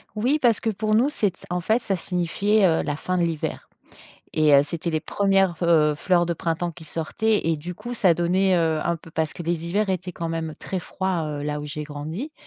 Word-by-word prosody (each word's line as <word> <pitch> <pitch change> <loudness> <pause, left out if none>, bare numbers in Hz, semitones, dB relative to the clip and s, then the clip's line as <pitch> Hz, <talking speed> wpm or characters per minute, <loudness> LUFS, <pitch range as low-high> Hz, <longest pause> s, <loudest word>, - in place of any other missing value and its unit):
Oui 250 +8 +1
parce 235 -6 +3
que 225 - 0
pour 215 +1 0
nous 245 +6 +4
c'est 205 - 0
c - - -20
en 180 0 -1
fait 220 +7 +2
ça 195 -5 -2
signifiait, 190 +4 +1
heu, 165 -3 +3
la 145 - -2
fin 185 +4 -2
de 175 - +2
l'hiver 165 -3 -3 0.7
et 155 -2 +4
heu, 140 - +7
c'était 170 +3 -4
les 155 -1 0
1res 195 -1 +2
v 170 +1 -2
heu, 155 -3 +4
fleurs 175 +2 +2
de 170 - -1
printemps 170 +1 -2
qui 160 - -12
sortaient 170 +7 -1
et 160 -2 +1
du 175 +4 -6
coup 225 +6 -7
ça 190 -7 +3
donnait, 185 +3 +2
heu, 160 -2 +1
un 170 - 0
peu 165 0 -15
parce 160 -1 -2
que - - -6
les 170 0 -2
hivers 200 +3 +1
étaient 180 0 -3
quand 165 -1 -4
même 165 -1 -3
très 190 - -4
froids, 185 -1 -2
heu, 145 -1 -4
là 150 0 -2
où 150 - -6
j'ai 150 +1 -5
grandi 155 - -6
175 Hz, 240 wpm, -24 LUFS, 160-195 Hz, 0.7 s, heu